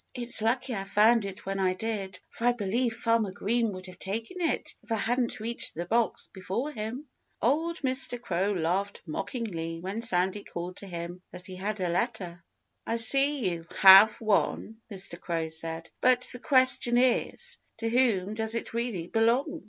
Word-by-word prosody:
It's 240 -2 +5
lucky 245 +3 -1
I 195 -3 -3
found 215 +3 +3
it 195 0 -8
when 195 0 -3
I 185 -1 +1
did, 200 -2 -4
for 230 - -5
I 245 - +4
believe 230 +2 -1
Farmer 230 -2 0
Green 230 +4 -1
would 185 0 -9
have 185 -1 -12
taken 225 - -4
it 330 - -1
if - - -16
I - - +2
hadn't 240 +3 -1
reached 230 +2 -3
the 170 +2 -4
box 230 +5 0
before 195 +10 -4
him." 235 +4 -6 0.3
Old 325 +7 0
Mr. 260 -2 +2
Crow 195 -3 -1
laughed 190 +3 -2
mockingly 165 -2 -5
when 190 +6 -5
Sandy 190 -2 0
called 175 +2 -7
to 200 - -5
him 175 0 -7
that 180 - -11
he 185 -1 -8
had 205 +3 -4
a 180 -2 -1
letter. 180 -3 -3 0.4
"I 230 - -2
see 270 -1 +6
you 165 -1 -7
have 195 +3 +8
one," 220 +1 -1
Mr. 185 -3 -2
Crow 165 -2 -3
said. 165 +1 -5
"But 250 0 +3
the 245 - -7
question 255 -2 +3
is, 250 0 +1 0.2
to 230 - -3
whom 225 -5 +1
does 220 +1 0
it 230 - -5
really 230 -7 -3
belong? 235 - 0
215 Hz, 175 wpm, -27 LUFS, 185-240 Hz, 0.4 s, have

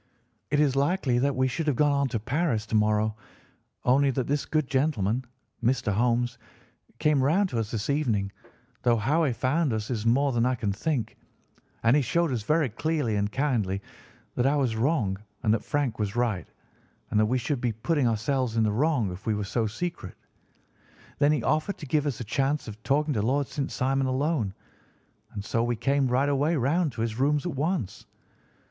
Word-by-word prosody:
It 145 - +1
is 145 -3 +3
likely 140 -3 +1
that 140 +1 +1
we 130 0 +2
should 155 +5 -3
have 145 - +2
gone 145 +3 +3
on 140 -1 +2
to 115 -3 -2
Paris 130 -1 0
to 110 - -3
morrow, 105 0 +2 0.7
only 135 +3 +4
that 130 -1 -1
this 145 +1 -1
good 155 -3 0
gentleman, 130 -5 0 0.4
Mr. 120 -3 +1
Holmes, 120 +2 +1 0.6
came 150 -1 +2
round 180 +9 +2
to 120 - -2
us 110 -2 -2
this 115 -2 -3
evening, 115 -10 0 0.5
though 120 -1 +3
how 150 +10 +2
he 135 - +1
found 135 +5 0
us 110 +2 -3
is 110 -4 -2
more 135 +5 +3
than 120 -2 +1
I 130 +1 +2
can 105 -4 -2
think, 120 +1 -2 0.7
and 115 +4 +5
he 150 - +4
showed 170 +5 +1
us 120 -4 -1
very 155 +6 +2
clearly 145 -1 -1
and 100 0 0
kindly 110 -8 0 0.5
that 125 - +1
I 140 - +3
was 130 -6 +1
wrong 110 -6 0 0.2
and 110 -2 +3
that 110 - 0
Frank 145 -6 -1
was 105 0 -2
right, 120 -6 0 0.6
and 105 - +3
that 110 - +3
we 125 +3 +1
should 125 +2 -2
be 120 - +1
putting 130 +5 0
ourselves 115 +1 0
in 110 - +4
the 105 - +2
wrong 125 - +1
if 90 +5 -9
we 110 - +2
were 105 - -2
so 110 +3 -1
secret. 115 - -5 1.0
Then 145 0 +4
he 145 -6 0
offered 155 +6 0
to - - -8
give 150 +1 +1
us 130 -7 -2
a - - -3
chance 135 +6 -1
of 110 0 -9
talking 145 +4 +1
to 105 - 0
Lord 135 +6 +1
St. 140 +1 -3
Simon 135 +1 0
alone, 130 - 0 0.8
and 100 -1 -6
so 115 +1 0
we 120 0 0
came 140 +3 +1
right 130 +3 +2
away 145 +4 +2
round 150 +4 +1
to 110 - -5
his 115 0 -2
rooms 145 +3 +2
at 175 - -2
once. 140 - -2
130 Hz, 200 wpm, -27 LUFS, 110-145 Hz, 1.0 s, and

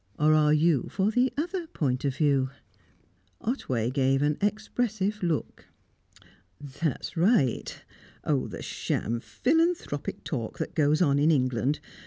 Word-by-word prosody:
Or 155 +1 +4
are 150 -1 +4
you 155 -2 +3
for 195 +2 0
the 250 +3 +2
other 345 +2 -2
point 135 - -1
of 135 -2 0
view?" 140 -4 +2 0.9
Otway 130 - -1
gave 135 0 +2
an 150 0 +1
expressive 210 0 -1
look. 170 -5 -2 0.9
"That's 145 +1 -4
right. 170 - +2 0.4
Oh, 140 -4 0
the - - -7
sham 115 +2 -2
philanthropic 320 - -1
talk 115 -7 -4
that - - -4
goes 155 +2 +3
on 140 -3 +3
in 150 +2 +4
England! 130 -2 +1
150 Hz, 130 wpm, -27 LUFS, 135-210 Hz, 0.9 s, Or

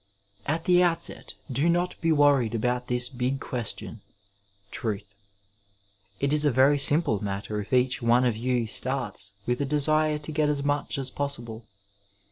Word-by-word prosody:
At 160 +3 -1
the 180 0 +5
outset 170 -1 -1 0.2
do 140 +7 +1
not 175 +1 +1
be 165 - +2
worried 140 -6 +3
about 125 +2 -1
this 125 0 +2
big 130 +1 -2
question 120 -5 -4 0.3
— 100 0 -38
^Truth. 105 -2 -4 1.1
It 140 +1 +1
is 150 0 +3
a 150 - +4
very 140 +2 +4
simple 140 - +3
matter 105 +1 -3
if 100 - -11
each 125 0 +2
one 120 +2 +3
of 120 -3 +1
you 120 +1 0
starts 115 -3 -2
with 125 0 -1
the 140 - 0
desire 150 +2 +1
to 150 +1 -7
get 150 -1 +1
as 145 -1 -1
much 145 +1 -1
as 135 -1 -2
possible. 120 -6 -5
130 Hz, 165 wpm, -26 LUFS, 115-145 Hz, 1.1 s, the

